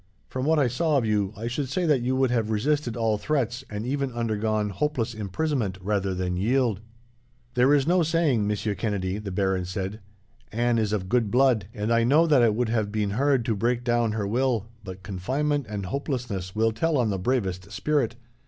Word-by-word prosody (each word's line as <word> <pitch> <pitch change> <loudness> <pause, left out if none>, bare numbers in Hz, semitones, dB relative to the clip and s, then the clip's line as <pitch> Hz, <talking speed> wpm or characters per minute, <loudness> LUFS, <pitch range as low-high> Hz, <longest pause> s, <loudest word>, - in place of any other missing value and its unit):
From 130 0 -3
what 160 +1 +3
I 140 -4 +3
saw 150 +5 +1
of 125 - +1
you, 105 -3 +1
I 110 - -5
should 125 +3 -2
say 180 +6 0
that 150 -6 +3
you 130 +2 0
would 130 -1 +2
have 115 -3 0
resisted 120 +3 0
all 110 -2 +1
threats, 125 +1 -1
and 105 +1 -4
even 140 +1 -1
undergone 110 -2 -1
hopeless 125 -2 -1
imprisonment, 110 - -2
rather 95 -1 -1
than 90 0 -2
yield." 115 +1 +1 0.7
"There 125 +3 +4
is 145 -2 +4
no 175 +3 +3
saying, 155 -9 +2
Monsieur 105 0 -1
Kennedy," 100 -1 -2
the 105 -2 -6
baron 95 -1 0
said. 95 +3 -4 0.5
"Anne 120 +1 +1
is 105 -2 0
of 100 -3 -1
good 115 0 +1
blood, 125 -4 +3
and 110 0 -1
I 115 0 +3
know 145 +8 +5
that 145 -6 +4
it 110 -3 +3
would 120 0 0
have 110 -3 0
been 105 -2 -1
hard 135 +2 +2
to 115 - 0
break 120 +3 0
down 120 -2 +1
her 105 -2 -2
will, 120 0 0 0.2
but 95 -1 -9
confinement 130 +9 -1
and 100 -2 -4
hopelessness 115 - -3
will 115 +1 +2
tell 155 +8 0
on 120 -4 +1
the 95 - -2
bravest 95 -4 -1
spirit. 125 +2 0
115 Hz, 200 wpm, -26 LUFS, 105-130 Hz, 0.7 s, know